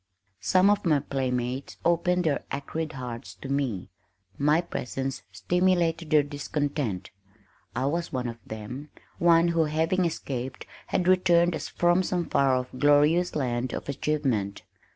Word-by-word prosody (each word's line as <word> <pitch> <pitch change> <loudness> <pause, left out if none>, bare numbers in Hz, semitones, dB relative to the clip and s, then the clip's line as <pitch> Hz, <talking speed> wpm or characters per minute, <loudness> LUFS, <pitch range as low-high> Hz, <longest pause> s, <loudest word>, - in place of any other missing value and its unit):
Some 185 +2 +4
of 205 - +1
my 155 -4 +3
playmates 130 -1 -2
opened 175 +1 +2
their 155 -4 0
acrid 155 +3 -4
hearts 125 -1 -7
to - - -9
me. 135 -9 -2 0.4
My 150 +3 +3
presence 135 -5 -4
stimulated 170 - +1
their 150 -1 +5
discontent. 145 - -3 0.6
I 130 +3 0
was 170 +4 -1
one 125 -2 -2
of 115 0 -6
them, 110 +7 -7 0.3
one 170 0 +5
who 165 -1 +2
having 160 +4 +1
escaped 130 -5 -4 0.2
had 180 - 0
returned 175 -2 +4
as - - -4
from 175 +1 +3
some 180 -2 -1
far 135 -3 +3
off 125 0 -2
glorious 150 +6 +4
land 125 -3 -1
of - - -5
achievement. 135 -9 -1
145 Hz, 140 wpm, -27 LUFS, 130-170 Hz, 0.6 s, their